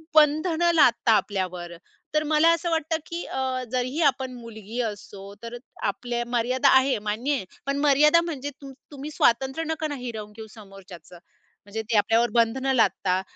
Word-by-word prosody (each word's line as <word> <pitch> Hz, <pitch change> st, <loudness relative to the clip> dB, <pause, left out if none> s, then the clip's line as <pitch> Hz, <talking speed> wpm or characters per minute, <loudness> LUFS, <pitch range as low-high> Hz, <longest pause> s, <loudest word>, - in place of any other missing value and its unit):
बंधन 310 Hz, +2 st, +3 dB
लादता 240 Hz, -6 st, +4 dB
आपल्यावर, 185 Hz, -5 st, -1 dB, 0.4 s
तर 305 Hz, -, +2 dB
मला 310 Hz, +2 st, +4 dB
असं 335 Hz, +1 st, -2 dB
वाटतं 320 Hz, 0 st, 0 dB
की 340 Hz, +1 st, -5 dB
अ, 260 Hz, -1 st, -2 dB
जरीही 255 Hz, +5 st, -1 dB
आपण 260 Hz, -1 st, -5 dB
मुलगी 230 Hz, -1 st, -8 dB
असतो, 200 Hz, -2 st, -7 dB
तर 235 Hz, +1 st, -6 dB, 0.3 s
आपल्या 240 Hz, +4 st, -2 dB
मर्यादा 250 Hz, +3 st, +2 dB
आहे, 265 Hz, +1 st, +2 dB
मान्य 235 Hz, +8 st, -1 dB
आहे. 195 Hz, -, -4 dB, 0.2 s
पण 275 Hz, 0 st, -1 dB
मर्यादा 300 Hz, +4 st, +5 dB
म्हणजे 290 Hz, -5 st, -4 dB
तुम 275 Hz, -1 st, -9 dB, 0.2 s
तुम्ही 285 Hz, +2 st, -7 dB
स्वातंत्र्य 265 Hz, +4 st, +1 dB
नका 315 Hz, 0 st, -2 dB
ना, 290 Hz, -, -5 dB
हिरवून 225 Hz, -5 st, -7 dB
घेऊ 220 Hz, -1 st, -9 dB
समोरच्याचं. 195 Hz, -5 st, -13 dB, 0.5 s
म्हणजे 220 Hz, +2 st, -5 dB
ते 220 Hz, +1 st, -3 dB
आपल्यावर 225 Hz, +3 st, +3 dB
बंधनं 245 Hz, +3 st, +2 dB
लादता, 190 Hz, -5 st, +2 dB
250 Hz, 155 wpm, -25 LUFS, 220-290 Hz, 0.5 s, मर्यादा